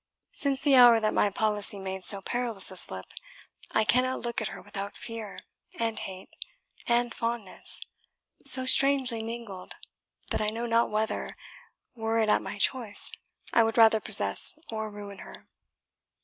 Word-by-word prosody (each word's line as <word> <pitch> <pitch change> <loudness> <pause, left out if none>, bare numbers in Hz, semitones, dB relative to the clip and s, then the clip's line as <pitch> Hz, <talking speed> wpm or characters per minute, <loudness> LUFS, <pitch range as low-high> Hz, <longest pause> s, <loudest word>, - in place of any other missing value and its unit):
Since 275 -1 -3
the 285 - +2
hour 240 -2 +7
that 215 -1 -1
my 205 - +2
policy 210 0 +1
made 190 -1 -7
so 195 +1 +2
perilous 230 -3 -3
a - - -10
slip, 95 - 0 0.6
I 220 - +1
cannot 255 +4 0
look 235 -1 -3
at - - -2
her - - -9
without 200 0 -8
fear, 225 -3 -7 0.4
and 225 -1 -2
hate, 190 0 -10 0.5
and 240 0 0
fondness, 230 -4 +1 0.6
so 260 -1 +7
strangely 265 -3 +4
mingled, 225 -5 -9 0.6
that - - -2
I 210 - 0
know 230 +2 -5
not 230 0 +1
whether, 215 +1 -4 0.6
were 225 -1 -3
it 220 -1 +1
at - - +2
my - - -8
choice, 220 -1 +2 0.4
I 235 - +4
would 225 +1 -2
rather 225 -1 +5
possess - - +2
or 220 -1 -5
ruin 205 -1 -11
her. - - -13
225 Hz, 155 wpm, -27 LUFS, 205-240 Hz, 0.6 s, hour